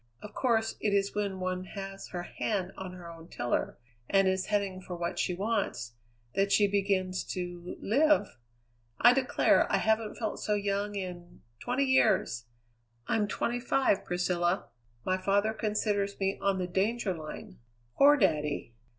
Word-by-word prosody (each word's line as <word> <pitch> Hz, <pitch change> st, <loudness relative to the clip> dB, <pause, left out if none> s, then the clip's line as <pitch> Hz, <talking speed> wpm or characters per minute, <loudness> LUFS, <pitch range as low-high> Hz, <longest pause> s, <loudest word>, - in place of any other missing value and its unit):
Of 210 Hz, -, -9 dB
course 225 Hz, -3 st, +1 dB
it 205 Hz, -1 st, +1 dB
is 200 Hz, 0 st, +1 dB
when 200 Hz, -2 st, -2 dB
one 185 Hz, 0 st, -2 dB
has 195 Hz, 0 st, -6 dB
her 175 Hz, -1 st, -5 dB
hand 190 Hz, 0 st, -2 dB
on 190 Hz, -1 st, -7 dB
her 180 Hz, -2 st, -10 dB
own 165 Hz, -1 st, -11 dB
tiller, 120 Hz, -6 st, -2 dB, 0.3 s
and 195 Hz, -1 st, +4 dB
is 190 Hz, 0 st, 0 dB
heading 200 Hz, -3 st, -1 dB
for 180 Hz, -1 st, -7 dB
what 170 Hz, 0 st, -3 dB
she 180 Hz, -, 0 dB
wants, 195 Hz, -, -2 dB, 0.4 s
that 195 Hz, 0 st, +1 dB
she 205 Hz, -, +5 dB
begins 195 Hz, -2 st, 0 dB
to 175 Hz, -1 st, -5 dB
live. 280 Hz, -, +2 dB, 0.6 s
I 240 Hz, -, +7 dB
declare, 260 Hz, 0 st, +3 dB
I -, -, +4 dB
haven't 220 Hz, -1 st, +1 dB
felt 220 Hz, -3 st, -3 dB
so 210 Hz, -, 0 dB
young 205 Hz, 0 st, -1 dB
in 175 Hz, -2 st, -7 dB, 0.2 s
twenty 255 Hz, +3 st, 0 dB
years! 230 Hz, -, +2 dB, 0.6 s
I'm 210 Hz, -2 st, +1 dB
twenty 240 Hz, +3 st, -1 dB
five, 245 Hz, -4 st, +2 dB
Priscilla. 175 Hz, 0 st, 0 dB, 0.4 s
My 185 Hz, -, +1 dB
father 200 Hz, +3 st, +2 dB
considers 210 Hz, -2 st, -1 dB
me 195 Hz, 0 st, 0 dB
on 195 Hz, -1 st, +1 dB
the 185 Hz, -, -1 dB
danger 195 Hz, +3 st, 0 dB
line. 155 Hz, -3 st, -9 dB, 0.4 s
Poor 290 Hz, +1 st, +7 dB
daddy!" 150 Hz, -, 0 dB
195 Hz, 155 wpm, -30 LUFS, 180-215 Hz, 0.6 s, I